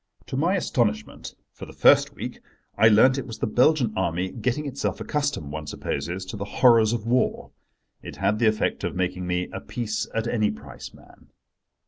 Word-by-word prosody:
To - - -6
my 170 +8 +1
astonishment—for 110 - -3
the - - -12
first - - +4
week—I 110 +2 -2
learnt 125 +5 +5
it 135 - -6
was 115 - -7
the - - -1
Belgian 125 +1 +2
Army, 90 0 -1
getting 130 +5 -2
itself 140 -1 -3
accustomed, 145 - -2
one 75 -1 -6
supposes, 90 +5 -4
to 105 +3 -7
the 100 - -4
horrors 115 +1 +4
of 115 -2 -3
war. 125 +2 0 0.5
It - - -9
had 105 +1 0
the 115 - +3
effect 110 0 0
of - - -3
making 90 0 -2
me 90 0 -1
a - - -4
peace 110 -3 -3
at 115 0 -2
any 110 -3 +1
price 70 0 -9
man. - - -19
110 Hz, 175 wpm, -24 LUFS, 95-125 Hz, 0.5 s, learnt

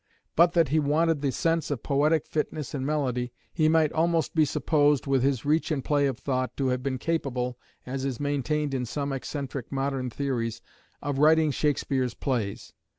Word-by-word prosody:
But 170 +1 +5
that 165 -5 +3
he 155 +3 +3
wanted 155 +1 +2
the 140 -2 +1
sense 165 +3 0
of 140 -6 -3
poetic 150 +2 +2
fitness 150 -2 -3
and 135 -3 -2
melody, 130 -4 -1 0.2
he 155 -2 +3
might 160 -1 +3
almost 165 0 +1
be 155 -2 +4
supposed, 145 -1 +2
with 135 -2 +2
his 135 -2 0
reach 155 +5 +2
and 145 -5 -2
play 145 -1 +2
of 130 -3 -2
thought, 130 -1 -2
to 135 -2 +1
have 125 0 0
been 130 0 -2
capable, 125 -5 -2 0.3
as 130 +1 -4
is 135 -4 -2
maintained 145 +1 -1
in 125 -2 -1
some 140 +3 -3
eccentric 135 -1 -5
modern 135 -2 -1
theories, 120 -4 -2 0.4
of 140 -1 -2
writing 155 0 +5
Shakespeare's 135 -3 0
plays. 115 -8 -3
140 Hz, 180 wpm, -27 LUFS, 130-155 Hz, 0.4 s, But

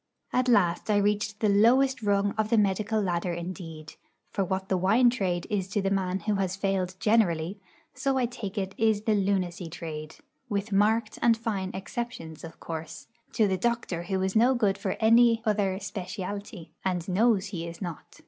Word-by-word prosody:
At 255 0 +2
last 195 -6 +2
I 210 - +4
reached 205 +1 0
the 215 - +3
lowest 240 +6 +4
rung 200 -1 +2
of 215 -1 0
the 230 - +3
medical 210 +2 +1
ladder 175 -3 -1
indeed; 170 -3 -7 0.4
for 195 - 0
what 190 +1 -2
the 190 - +1
wine 220 +7 +4
trade 185 -8 -1
is 195 -3 -1
to 195 +2 -1
the 195 - 0
man 190 -1 0
who 210 - 0
has 190 -1 -1
failed 195 -2 -1
generally, 195 -4 +2 0.3
so 270 -1 0
I 255 - +2
take 230 -4 -6
it 195 -1 -2
is 220 -2 +2
the 220 - +2
lunacy 190 -4 0
trade 155 -2 -7 0.3
(with 205 0 -2
marked 210 +2 +2
and 230 -1 +4
fine 205 -5 -2
exceptions, 190 -6 -6
of 165 - -10
course) 160 -1 -7 0.2
to 215 - +3
the 190 -1 -1
doctor 235 -6 -1
who 190 +2 -2
is 190 +2 -1
no 245 +4 +5
good 210 -5 +1
for 190 - -2
any 230 0 +5
other 200 -3 +1
'specialty,' 195 -3 -6
and 180 -3 -1
knows 205 +1 +2
he 170 -2 -4
is 170 0 -8
not. 175 -6 -7
200 Hz, 185 wpm, -27 LUFS, 180-220 Hz, 0.4 s, no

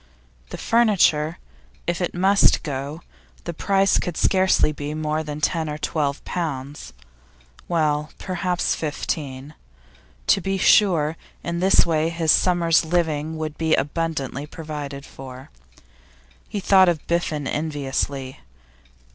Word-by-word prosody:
The - - -6
furniture? 180 -9 +3 0.5
If 175 +1 -1
it 180 - -2
must 195 +3 +4
go, 145 +1 -5 0.4
the 170 - -5
price 195 +3 +2
could 175 -3 -4
scarcely 190 -4 +3
be 150 0 -5
more 155 0 -1
than 150 -1 -6
ten 160 0 0
or 150 - -4
twelve 150 -2 -2
pounds; 145 -5 -4 0.8
well, 155 -3 0
perhaps 180 -1 -1
fifteen. 145 -2 -4 0.7
To 195 - +3
be 195 +1 -1
sure, 165 -6 +4 0.3
in 170 0 -3
this 190 +2 +5
way 160 -1 +1
his 165 -2 +2
summer's 170 -3 +3
living 160 -2 -1
would 155 -1 -5
be 160 -1 +3
abundantly 145 -1 -2
provided 150 -4 -7
for. 130 -1 -11 1.0
He 205 - -3
thought 190 -1 +5
of 165 -4 -2
Biffen 160 -4 -1
enviously. 140 -3 -3
160 Hz, 120 wpm, -23 LUFS, 150-175 Hz, 1.0 s, this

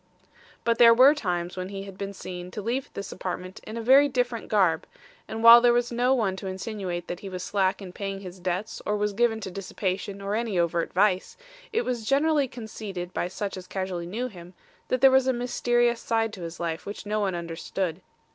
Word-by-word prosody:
"But 230 -1 +1
there 230 -1 +8
were 260 +4 +8
times 180 - -2
when 185 0 -4
he 195 -1 -6
had 195 -1 -10
been 200 +1 -5
seen 180 -2 -7
to 210 - -6
leave 250 +5 -2
this 200 - -5
apartment 185 0 -5
in 220 - -6
a 230 - -4
very 275 +4 +6
different 245 -3 -1
garb, 185 -7 +2 0.4
and 225 +1 -5
while 235 +1 +11
there 240 0 +5
was 240 0 +1
no 245 +2 +2
one 205 -6 0
to 190 - -6
insinuate 185 -2 -4
that 175 - -5
he 195 - -7
was 185 -1 -5
slack 195 0 0
in 180 -2 -9
paying 195 0 -5
his 185 -1 -9
debts 185 +5 -3
or 210 - 0
was 210 0 0
given 225 +1 +2
to 190 - -5
dissipation 195 +1 -3
or 200 +1 -3
any 220 -3 -1
overt 170 -1 0
vice, 190 0 +1 0.3
it 450 +1 +1
was 245 -3 -2
generally 285 +4 +2
conceded 210 -6 -7
by - - -1
such 195 +2 -4
as 185 -1 -9
casually 185 -3 -4
knew 230 +8 -3
him, 180 -5 -12 0.3
that 255 - 0
there 270 0 +8
was 265 0 +4
a 260 - +3
mysterious 240 -1 +1
side 225 -1 0
to 195 - -8
his 170 0 -7
life 165 0 -3
which 205 +1 -6
no 210 +1 -1
one 195 -3 0
understood. 170 +1 -4
200 Hz, 215 wpm, -26 LUFS, 185-235 Hz, 0.4 s, while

